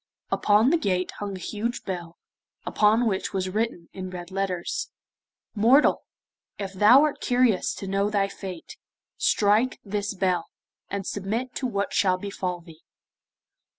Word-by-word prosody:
Upon 215 +5 +4
the 340 - +3
gate 185 - 0
hung 205 -1 -4
a - - -10
huge 225 +6 -3
bell, 175 -3 -6 0.5
upon 220 +3 +3
which 200 -2 -1
was 190 -1 -1
written 205 -4 -2
in 185 -1 -6
red 180 0 -8
letters: 190 -2 -2 0.6
'Mortal, 235 +7 +4 0.6
if 195 -1 -5
thou 215 +9 +7
art 305 -2 -1
curious 245 -6 +2
to - - -7
know 195 +1 0
thy 200 -2 +1
fate, 190 -3 -8 0.4
strike 215 +5 +2
this 205 0 -3
bell, 185 -3 0 0.4
and 200 -1 -3
submit 220 +7 -3
to 260 - -1
what 200 -4 -2
shall 185 -2 +3
befall 185 -2 -4
thee. 165 -1 -15
200 Hz, 145 wpm, -25 LUFS, 185-220 Hz, 0.6 s, thou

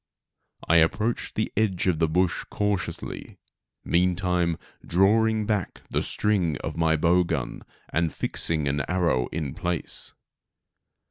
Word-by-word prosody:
I 85 - +5
approached 105 +8 +1
the - - -1
edge 100 -4 +1
of 90 -4 +1
the 80 - +3
bush 90 +2 +1
cautiously, 105 -2 -3 0.5
meantime, 90 -1 +1 0.3
drawing 110 +4 +3
back 105 -3 -2
the - - +1
string 95 -8 0
of - - -4
my 80 -1 +2
bow 85 +3 +3
gun 80 -7 -3 0.3
and 80 -1 0
fixing 80 -3 +1
an 70 +1 0
arrow 85 -9 +1
in 75 -4 -4
place. 90 -4 -3
90 Hz, 125 wpm, -26 LUFS, 80-100 Hz, 0.5 s, I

